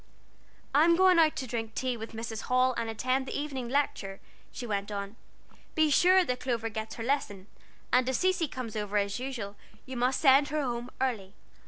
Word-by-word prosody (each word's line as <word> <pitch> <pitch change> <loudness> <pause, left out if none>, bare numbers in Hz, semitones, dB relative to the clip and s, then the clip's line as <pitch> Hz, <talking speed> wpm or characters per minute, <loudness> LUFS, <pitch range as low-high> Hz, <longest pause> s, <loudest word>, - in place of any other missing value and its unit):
"I'm 325 +4 +5
going 370 -1 +5
out 315 -2 +4
to 260 - -3
drink 225 -2 -4
tea 255 -1 -1
with 225 0 -8
Mrs. 225 0 -5
Hall 255 0 +3
and 230 - -2
attend 255 +4 -1
the - - -3
evening 270 -5 -4
Lecture," 240 -8 -1 0.3
she 250 - -6
went 205 -2 -2
on. 200 +1 -5 0.6
"Be 315 -1 +3
sure 365 +5 +5
that 250 -3 -2
Clover 235 -3 -2
gets 220 0 -5
her 225 - -5
lesson, 225 -7 -1 0.5
and 250 +1 +4
if 260 - 0
Cecy 365 -1 +1
comes 250 -5 -6
over 210 -1 -2
as 200 +2 0
usual, 240 -6 -5 0.3
you 260 - -7
must 250 +2 +1
send 275 0 +6
her 300 0 -1
home 240 -1 -3
early. 220 -7 -2
250 Hz, 190 wpm, -29 LUFS, 220-275 Hz, 0.6 s, send